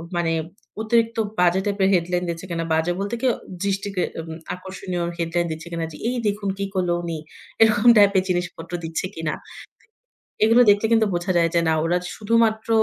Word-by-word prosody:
মানে 165 -1 +1 0.5
অতিরিক্ত 230 +1 +1 0.2
বাজে 180 +1 +4
টাইপের 200 -1 +1
হেডলাইন 180 0 +1
দিচ্ছে 170 +2 -5
কিনা? 165 -1 -2
বাজে 160 +2 +1
বলতে 200 +4 -2
কি 265 - +2 0.4
দৃষ্টি 200 0 -1
কে 180 - +1 0.2
উম 160 0 -8 0.2
আকর্ষণীয় 185 -1 -5
হেডলাইন 170 +1 0
দিচ্ছে 160 +2 -7
কিনা 165 -1 -2
যে 150 - -10
এই 250 - -2
দেখুন 205 -1 -1
কি 200 - -2
করলো 180 -2 0
উনি 165 -2 -3 0.4
এরকম 220 +1 +6
টাইপের 200 -2 +5
জিনিসপত্র 175 -2 -3
দিচ্ছে 160 +2 -3
কিনা। 160 -1 -2 1.1
এগুলো 230 +3 +5
দেখলে 205 +2 +3
কিন্তু 225 -1 +4
বোঝা 175 +2 -1
যায় 170 -1 +3
যে 170 - +4
না - - +4
ওরা 175 +2 +2 0.2
শুধুমাত্র 220 0 +1
185 Hz, 175 wpm, -23 LUFS, 170-205 Hz, 1.1 s, এরকম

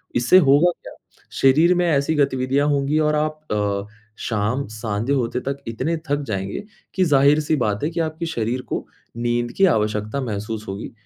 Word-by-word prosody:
इससे 120 +10 +5
होगा 150 +2 +5
क्या? - - -10 0.4
शरीर 155 +7 +4
में 180 0 +2
ऐसी 140 0 +1
गतिविधियाँ 135 0 +1
होंगी 145 +2 +1
और 150 0 +2
आप 155 0 -1
अ, 100 -1 -1 0.4
शाम 110 +5 -1
संध्या 110 +3 -2
होते 125 -2 0
तक 140 +1 -3
इतने 135 +9 -2
थक 145 +1 +1
जाएँगे 100 - -3 0.3
कि 190 - +3
जाहिर-सी 150 +1 +3
बात 105 -6 -1
है 150 - +1
कि 170 0 -4
आपके 160 +1 -2
शरीर 125 -5 -2
को - - -3 0.3
नींद 120 0 -1
की 195 - +5
आवश्यकता 110 - 0
महसूस 110 -2 -4
होगी, 100 +2 -6
135 Hz, 170 wpm, -21 LUFS, 110-150 Hz, 0.4 s, इससे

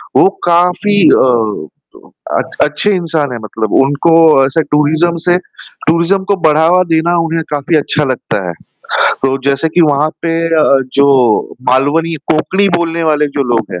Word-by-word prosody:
वो 385 - +5 0.2
काफ़ी 180 +4 +1 0.3
अ 110 -10 -1 0.7
अ, - - +1 0.2
अच्छे 150 +8 -1
इंसान 160 -6 -2
हैं, 120 - -5
मतलब 110 0 -4
उनको 145 +4 0 0.3
ऐसे 135 +4 0
टूरिज़्म 155 +3 +1
से 175 0 +3
टूरिज़्म 175 +1 -3
को - - +3
बढ़ावा 160 +4 +3
देना 165 +2 +1
उन्हें 165 0 -2
काफ़ी 150 +2 -1
अच्छा 150 0 -1
लगता 105 -6 -4
है, 85 - -4 0.7
तो 135 0 +1
जैसे 140 +3 0
कि 165 +3 0
वहाँ 145 +2 +1
पे 165 -1 -1
अ, 160 -2 +2 0.3
जो 135 -5 +2
मालवनी 145 +6 +1 0.2
कोंकणी 190 +6 0
बोलने 170 -1 -2
वाले 150 0 +1
जो - - +2
लोग 110 -3 -3
हैं, 90 - -6
155 Hz, 150 wpm, -12 LUFS, 140-170 Hz, 0.7 s, वो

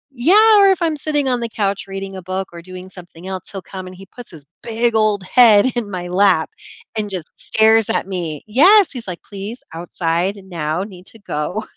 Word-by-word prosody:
Yeah, 415 - +5
or 395 -1 +6
if 380 -3 +2
I'm 320 -2 0
sitting 295 -1 -1
on 250 -2 0
the 235 -1 -3
couch 200 -2 -2
reading 195 0 -6
a 190 - -7
book 185 +2 -4
or 170 - -9
doing 185 +1 -10
something 180 -2 -13
else, 190 -2 -6
he'll 195 -2 -7
come 185 -1 -8
and 185 - -10
he 195 +1 -13
puts 240 +5 -13
his 155 -5 -14 0.2
big 230 +1 -1
old 215 -3 +1
head 215 0 +5
in 235 -4 -3
my 180 -2 -5
lap 180 -3 +2 0.4
and 215 -1 -3
just 185 -5 -6
stares 220 0 +3
at - - 0
me. 170 -6 -5
Yes, 355 - +5
he's 245 -6 -8
like, 180 -2 -7
"Please, 205 +4 -8
outside 170 +3 -2
now, 165 -1 -3
need 185 -3 -12
to - - -14
go." 200 +2 -4
195 Hz, 210 wpm, -18 LUFS, 180-230 Hz, 0.4 s, or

